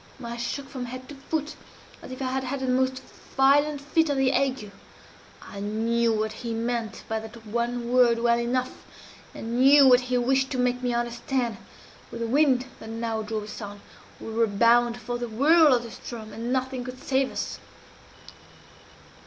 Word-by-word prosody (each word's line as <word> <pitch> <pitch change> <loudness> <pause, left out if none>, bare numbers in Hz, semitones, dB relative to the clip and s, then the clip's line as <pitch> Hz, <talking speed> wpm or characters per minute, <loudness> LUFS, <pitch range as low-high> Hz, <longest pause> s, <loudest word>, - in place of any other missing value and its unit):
I 235 0 -5
shook 240 +3 -4
from 260 -2 -6
head 255 +1 -8
to 290 - -8
foot 300 +2 -4 0.5
as - - -10
if 255 +1 -5
I 255 - -1
had 265 0 -1
had 265 +1 -3
the 260 - -2
most 260 +1 0 0.3
violent 285 +2 +4
fit 320 +2 +1
of 285 - 0
the 265 -1 +3
ague. 260 -6 -1 0.7
I 200 - -9
knew 225 +3 0
what 220 0 -1
he 230 0 -5
meant 230 -1 -3
by 220 0 -1
that 220 +1 -11
one 235 +2 -2
word 245 -2 +5
well 235 0 +2
enough 250 +2 -1 0.6
I - - -8
knew 265 +5 +5
what 250 -1 +7
he 250 0 -1
wished 265 +2 +2
to - - -2
make 250 0 +1
me 245 -1 0
understand. 240 -1 -2 0.5
With 235 - -7
the - - 0
wind 260 0 +3
that 220 - -9
now 225 -1 -3
drove 215 0 -4
us 210 +2 -8
on, 205 -1 -8 0.4
we 225 - -7
were 230 0 +2
bound 235 +3 +3
for 240 +1 -5
the 240 -1 -4
whirl 300 +7 +5
of 245 -2 +3
the 235 - -8
Ström, 230 -2 -9
and 230 +3 -5
nothing 260 -1 -1
could 250 +1 -7
save 265 0 0
us! - - -4
245 Hz, 185 wpm, -26 LUFS, 230-260 Hz, 0.7 s, what